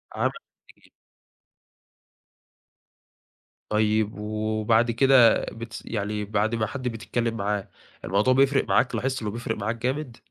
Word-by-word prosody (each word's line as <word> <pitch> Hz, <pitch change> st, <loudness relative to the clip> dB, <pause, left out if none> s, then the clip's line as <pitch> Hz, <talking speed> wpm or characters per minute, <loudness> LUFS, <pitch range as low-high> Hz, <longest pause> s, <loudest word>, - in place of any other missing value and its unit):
عم -, -, +1 dB, 0.5 s
جديد. -, -, -24 dB, 2.8 s
طيب، 110 Hz, 0 st, +1 dB
وبعد 110 Hz, +2 st, +1 dB
كده 125 Hz, 0 st, +5 dB
بتس 115 Hz, 0 st, -8 dB
يعني 105 Hz, -1 st, -3 dB
بَعد 105 Hz, +2 st, 0 dB
ما 110 Hz, -1 st, 0 dB
حَدّ 130 Hz, +2 st, -5 dB
بتتكلّم 115 Hz, 0 st, -2 dB
معاه، 100 Hz, 0 st, -2 dB, 0.4 s
الموضوع 100 Hz, +9 st, +2 dB
بيفرق 135 Hz, +1 st, +3 dB
معاك، 125 Hz, -, +2 dB
لاحظت 130 Hz, -1 st, -2 dB
إنّه 105 Hz, -, -3 dB
بيفرق 115 Hz, 0 st, -3 dB
معاك 110 Hz, +3 st, -2 dB
جامد؟ 125 Hz, +1 st, -3 dB
115 Hz, 115 wpm, -25 LUFS, 105-125 Hz, 2.8 s, كده